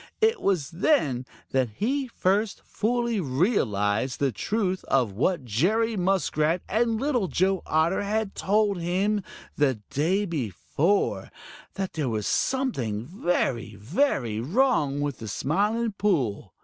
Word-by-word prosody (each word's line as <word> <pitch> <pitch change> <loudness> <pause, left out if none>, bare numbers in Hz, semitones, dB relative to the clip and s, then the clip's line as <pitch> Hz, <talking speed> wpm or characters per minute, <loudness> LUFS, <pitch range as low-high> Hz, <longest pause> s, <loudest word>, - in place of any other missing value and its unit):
It 445 -1 +2
was 180 -8 0
then 160 - +1 0.2
that 130 -3 +1
he 265 +5 0
first 205 -1 0
fully 235 0 -1
realized 130 - 0
the 140 -2 +2
truth 190 - -1
of 125 -6 +2
what 130 - 0
Jerry 210 - +1
Muskrat 175 -3 +1
and 225 +1 +1
Little 255 -7 +1
Joe 190 +1 +1
Otter 160 +5 +2
had 210 0 -1
told 205 -2 +1
him 195 +4 0 0.3
the 140 -3 +3 0.2
day 180 +8 +1
before 160 - -1 0.5
that 195 -2 -3
there 150 -5 -1
was 110 -3 -2
something 130 - 0
very, 135 - -1
very 120 - 0
wrong 150 - +1
with 145 -2 -2
the 110 - -7
Smiling 205 - 0
Pool. 135 - -1
180 Hz, 125 wpm, -26 LUFS, 130-215 Hz, 0.5 s, the